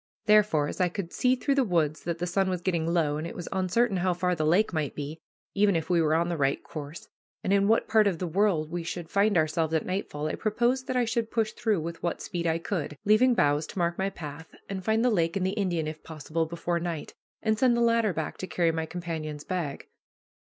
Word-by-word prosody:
Therefore, 210 -9 +4
as - - -4
I 180 - +3
could 175 -1 -5
see 255 0 +3
through 275 +2 0
the 275 -1 +3
woods 165 -7 0
that 170 0 -2
the 175 - -2
sun 190 +2 +1
was 180 -2 -2
getting 170 -3 0
low, 155 -4 +1
and 155 +2 -4
it - - -8
was 175 - -6
uncertain 195 +3 +1
how 180 0 +1
far 180 0 0
the 155 -3 0
lake 185 +5 +3
might 155 -3 -2
be, 150 +2 -5 0.3
even 200 -1 +3
if 165 +2 -1
we 170 -1 +4
were 155 0 +2
on 170 +1 +2
the 170 -1 -2
right 140 -1 0
course, 150 +1 -8 0.4
and 190 - +1
in 200 0 +3
what 225 +2 +3
part 220 -2 +4
of 185 -4 0
the 180 - -3
world 170 -3 +1
we 175 0 -2
should 170 0 -6
find 200 -1 +3
ourselves 160 0 +1
at 160 - 0
nightfall, 185 -6 -3
I 155 - -1
proposed 240 +4 0
that 255 - -2
I 250 -1 +3
should 225 0 -1
push 225 -2 0
through 215 -7 0
with 165 +1 -6
what 175 - -2
speed 170 -1 -3
I 165 0 +2
could, 165 -4 -3
leaving 235 +4 +5
boughs 145 -4 +2
to - - -10
mark 170 0 0
my 195 +1 +1
path, 155 -3 -9
and 190 -1 -5
find 220 +3 +2
the 250 - +4
lake 165 -4 +1
and 185 - 0
the 190 - +1
Indian, 180 -6 -1
if 155 0 -6
possible, 160 +1 -3
before 170 +1 -2
night, 170 -3 -4 0.3
and 220 -1 +1
send 245 -2 +4
the - - +1
latter 230 -2 +3
back 160 -3 -4
to 185 - -4
carry 170 -3 +1
my 160 0 -3
companion's 160 -4 -5
bag. 170 -7 -3
175 Hz, 245 wpm, -28 LUFS, 160-205 Hz, 0.4 s, leaving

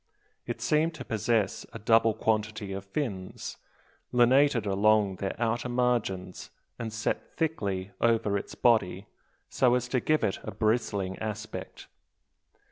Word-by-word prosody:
It - - -4
seemed 160 +2 +2
to 125 -5 -8
possess 110 -2 0
a - - -5
double 115 0 +3
quantity 110 -2 -1
of 100 0 -6
fins, 95 -4 -4 0.5
lunated 125 -1 +4
along 100 -1 +3
their 95 +1 -3
outer 120 +1 0
margins, 120 -7 -1 0.3
and 115 -1 -4
set 110 0 -3
thickly 100 - -1
over 115 -3 +2
its 100 - -4
body, 105 -5 +2 0.4
so 125 -2 +3
as 125 -1 -1
to 130 - +1
give 155 +4 +1
it 95 - 0
a - - -6
bristling 105 -4 0
aspect. 110 0 -6
110 Hz, 130 wpm, -28 LUFS, 100-120 Hz, 0.5 s, lunated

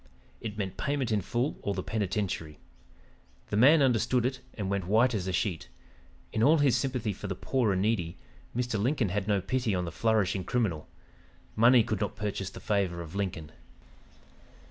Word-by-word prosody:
It 105 -1 -6
meant 95 -3 -4
payment 140 -5 -1
in 105 -2 +2
full 120 +9 -2
or 100 - -2
the 95 - -3
penitentiary. 95 -7 -2 0.9
The - - 0
man 140 +7 +6
understood 125 -1 +2
it 130 +1 -1 0.2
and 100 -3 -3
went 100 -2 -2
white 115 +5 +4
as 95 -4 -2
a - - 0
sheet. 85 - -2 0.6
In 110 - 0
all 150 +7 +6
his 145 -4 +3
sympathy 125 -6 -1
for 105 - -7
the 95 - -3
poor 120 +2 0
and 95 0 +1
needy, 95 -7 0 0.4
Mr. 120 -4 -1
Lincoln 125 -2 +1
had 100 +2 -2
no 100 -2 +2
pity 120 -1 0
on 90 -1 -1
the 85 - -5
flourishing 105 -1 +1
criminal. 100 -11 -1 0.7
Money 120 +2 +6
could 110 -2 -3
not 105 - -2
purchase 105 -3 -3
the - - -10
favor 95 -5 0
of 80 0 -11
Lincoln. 90 -6 -3
105 Hz, 180 wpm, -29 LUFS, 95-120 Hz, 0.9 s, man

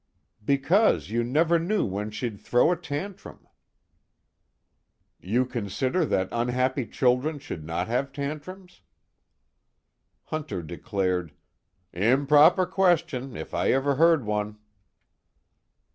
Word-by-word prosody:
"Because 140 - +2
you 120 +1 0
never 160 +7 +2
knew 200 +5 0
when 100 +2 -3
she'd 110 -1 -5
throw 125 +7 +3
a - - +2
tantrum." 175 +4 -7 1.7
"You 120 +7 0
consider 125 - -1
that 95 0 0
unhappy 125 +1 0
children 130 +5 +1
should 110 - -7
not 85 +3 -3
have 130 +4 -1
tantrums?" 155 +7 -7 1.4
Hunter 155 - -5
declared: 90 -1 -2 0.6
"Improper 145 - +4
question, 165 -10 0
if - - -8
I - - +1
ever 135 +2 +1
heard 165 -5 +4
one." 105 0 -2
130 Hz, 100 wpm, -26 LUFS, 105-160 Hz, 1.7 s, Improper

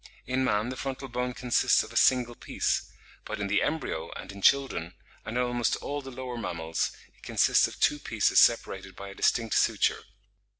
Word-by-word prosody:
In 130 +1 0
man 110 -2 +1
the 130 - -5
frontal 135 0 -5
bone 125 0 -3
consists 125 -1 +2
of 110 +1 -11
a - - -13
single 125 -1 +3
piece, - - -2 0.3
but 110 -1 -6
in 100 - -1
the 100 +1 +1
embryo, 150 - -2
and - - -8
in 100 0 -11
children, 135 -10 +2 0.3
and 115 +2 -3
in 125 - +2
almost 120 -1 0
all 145 0 -4
the 135 - -9
lower 125 -1 -6
mammals, 80 -5 -2 0.2
it - - -27
consists - - +3
of - - -11
two 150 -1 +2
pieces 110 -7 +2
separated 95 -5 +2
by 100 +1 -8
a - - -9
distinct 115 +3 +1
suture. - - +2
120 Hz, 190 wpm, -28 LUFS, 100-130 Hz, 0.3 s, single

